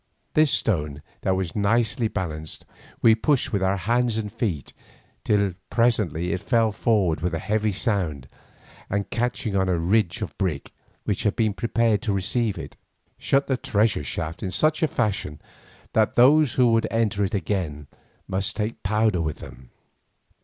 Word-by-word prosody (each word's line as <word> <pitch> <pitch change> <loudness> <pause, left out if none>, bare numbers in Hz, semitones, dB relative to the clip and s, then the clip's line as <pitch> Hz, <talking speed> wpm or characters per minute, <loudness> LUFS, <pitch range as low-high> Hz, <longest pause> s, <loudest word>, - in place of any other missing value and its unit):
This 155 -1 +4
stone, 75 - -1 0.2
that 95 - +1
was 95 -3 -3
nicely 115 +3 +1
balanced, 80 -7 -5 0.4
we 115 - +7
pushed 130 +3 +1
with 100 - +1
our 95 +1 +1
hands 120 +4 +1
and 105 -2 -3
feet 100 - -3 0.5
till 100 -3 +2 0.2
presently 100 -8 +1
it 90 - -3
fell 115 -3 +2
forward 100 -7 +1
with 90 0 -1
a - - -1
heavy 110 +4 0
sound, 90 - -1 0.6
and 100 +1 -2
catching 120 -3 -1
on 95 -1 +2
the 90 -2 +1
ridge 90 +1 +1
of - - -7
brick 80 -7 -2 0.3
which 100 - -1
had 105 - 0
been 110 -3 +1
prepared 115 +1 +1
to 110 -4 -1
receive 105 +3 0
it, - - -8 0.4
shut 140 +1 +2
the 130 - 0
treasure 105 - +1
shaft 80 +4 -4
in 95 - -2
such 155 - +1
a 160 - +3
fashion 100 - -2 0.5
that 110 -1 +2
those 140 +2 +5
who 125 -2 +4
would 115 0 +2
enter 110 -3 0
it 95 - -1
again 80 -6 -2 0.4
must 95 +1 -1
take 110 +1 -3
powder 105 -2 +1
with 80 -2 -2
them. 65 -1 -12
105 Hz, 165 wpm, -24 LUFS, 90-115 Hz, 0.6 s, we